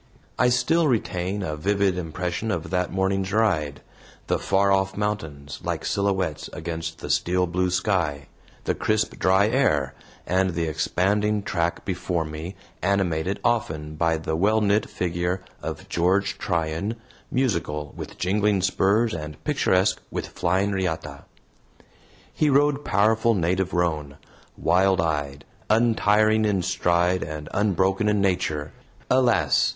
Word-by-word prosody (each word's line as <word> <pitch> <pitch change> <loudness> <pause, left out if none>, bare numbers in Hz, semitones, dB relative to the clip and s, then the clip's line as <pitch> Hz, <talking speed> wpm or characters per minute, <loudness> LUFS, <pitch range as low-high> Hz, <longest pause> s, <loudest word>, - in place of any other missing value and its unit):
I 125 - +5
still 150 +7 +2
retain 100 -5 -1
a 75 -4 -3
vivid 100 +3 +1
impression 90 +4 -3
of 85 -5 -3
that 90 -1 0
morning's 95 0 0
ride, 90 -10 +1 0.4
the - - 0
far 100 0 +2
off 95 0 +1
mountains, 80 -10 -4
like - - -3
silhouettes, 95 -6 -1
against 80 0 -5
the - - -6
steel 90 +1 +2
blue 90 +1 0
sky, 90 -6 0 0.4
the - - 0
crisp 110 0 -1
dry 95 +2 +4
air, 75 - +1 0.3
and 95 -1 +1
the 85 - 0
expanding 100 +7 0
track 85 -2 -1
before 90 -3 -2
me, 80 +5 -7 0.3
animated 95 -1 0
often 105 -11 -1
by 80 +1 +1
the 80 0 -3
well 105 +6 +3
knit 105 0 +1
figure 90 +1 -2 0.2
of - - -6
George 95 +4 +1
Tryan, 85 +5 -1 0.3
musical 80 - -1
with - - -8
jingling 100 +1 +1
spurs 100 +4 +2
and 75 -2 -7
picturesque 105 -10 +2
with - - -4
flying 95 +3 0
riata. 80 -7 -3 1.1
He 155 - +2
rode 145 +1 +3
powerful 110 +2 +2
native 90 +1 0
roan, 75 -6 -1 0.4
wild 95 +1 +3
eyed, 75 -3 -2 0.2
untiring 110 -1 +3
in 100 -4 +1
stride 90 0 +1
and 75 -1 -6
unbroken 95 0 +1
in 105 -1 +2
nature. 80 -6 0 0.4
Alas! 125 -2 +3
95 Hz, 130 wpm, -24 LUFS, 80-105 Hz, 1.1 s, I